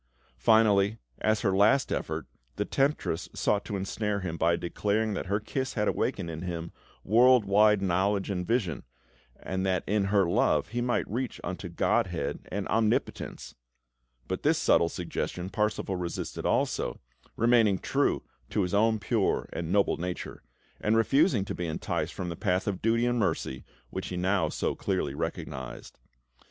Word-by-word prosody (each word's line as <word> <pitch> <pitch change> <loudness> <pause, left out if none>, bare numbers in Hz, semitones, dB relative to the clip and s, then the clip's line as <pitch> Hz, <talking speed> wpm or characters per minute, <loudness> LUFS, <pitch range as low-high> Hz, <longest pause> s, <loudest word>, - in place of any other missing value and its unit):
Finally, 105 - +4 0.2
as 110 0 +1
her 95 -3 +1
last 110 +7 +4
effort, - - -2 0.3
the 105 - -1
temptress 135 - 0
sought 105 -1 +1
to 100 - -4
ensnare 100 +1 -2
him 85 -3 -3
by 85 +1 +2
declaring 105 +5 -1
that 95 - -4
her 100 +2 +1
kiss 130 +5 -3
had 105 -2 +1
awakened 95 -4 -1
in 80 -1 -5
him 85 -2 -4 0.3
world 120 +2 +5
wide 105 0 +4
knowledge 95 +2 +1
and 90 -2 -3
vision, 100 - 0 0.6
and 95 0 -3
that 95 -1 +1
in 105 0 +1
her 100 -1 +3
love 85 - +2
he 120 +2 -2
might 120 0 0
reach 125 +4 -3
unto - - -5
Godhead - - 0
and 100 +1 -2
Omnipotence; 110 +1 -1 0.7
but - - -3
this - - +3
subtle 85 - +3
suggestion 90 +1 -4
Parsifal 105 -2 -1
resisted 85 -1 -4
also, - - 0 0.4
remaining 115 -4 +4
true - - 0 0.3
to 105 - +1
his 90 - -3
own 110 +2 +3
pure 105 - 0
and 85 0 -3
noble 100 0 +3
nature, 90 +1 -5 0.4
and 110 +2 +2
refusing 135 - +3
to - - -4
be 90 - -3
enticed 80 - -3
from 90 -2 -4
the 85 - -4
path 90 0 0
of 100 -3 -2
duty 115 +2 +2
and 120 0 +1
mercy 65 - -1 0.3
which 95 -1 -4
he 90 - -4
now 90 -2 +1
so - - -1
clearly - - -2
recognised. 65 -3 -6
100 Hz, 160 wpm, -28 LUFS, 90-110 Hz, 0.7 s, world